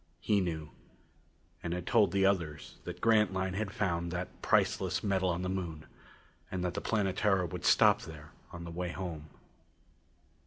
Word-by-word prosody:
He 105 -2 +2
knew, 80 -4 -3 0.9
and 85 -1 -3
had 90 -1 -5
told 105 -2 +4
the 95 0 +3
others 85 -7 -1
that 90 0 -7
Grantline 95 -4 +3
had 105 +1 -2
found 85 -4 -1
that 90 +1 -5
priceless - - +2
metal 95 -2 +1
on 90 +1 -1
the - - -1
Moon 85 -5 -4 0.6
and 90 -1 -2
that 90 - -1
the - - -3
Planetara 95 -2 +1
would 85 - -6
stop - - +5
there 75 -1 -10 0.2
on 85 0 -7
the 85 - -7
way 90 +1 -3
home. 85 -5 -5
90 Hz, 160 wpm, -32 LUFS, 85-95 Hz, 0.9 s, stop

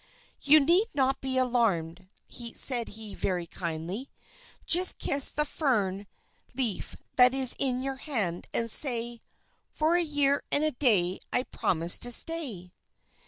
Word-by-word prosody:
"You 300 +2 +4
need 345 +9 +1
not 270 -1 -1
be 265 -1 -2
alarmed," 190 -9 -1 0.5
said 240 -4 +5
he 215 -1 -10
very 180 -2 -4
kindly. 170 - -7 0.6
"Just 365 +2 +6
kiss 280 -1 +4
the 300 - -2
fern 205 - -3 0.5
leaf 240 -6 -5 0.2
that 250 +1 +4
is 260 -2 +1
in 255 -1 -1
your 270 0 -5
hand, 210 - -4
and 230 -1 -2
say: 235 -3 +2 0.6
'_For 315 +2 +1
a - - 0
year 285 -2 -1
and 290 - 0
a 310 - 0
day 205 -10 0
I 250 - -1
promise 170 -8 0
to 245 - +2
stay! 235 - 0
250 Hz, 140 wpm, -26 LUFS, 195-280 Hz, 0.6 s, Just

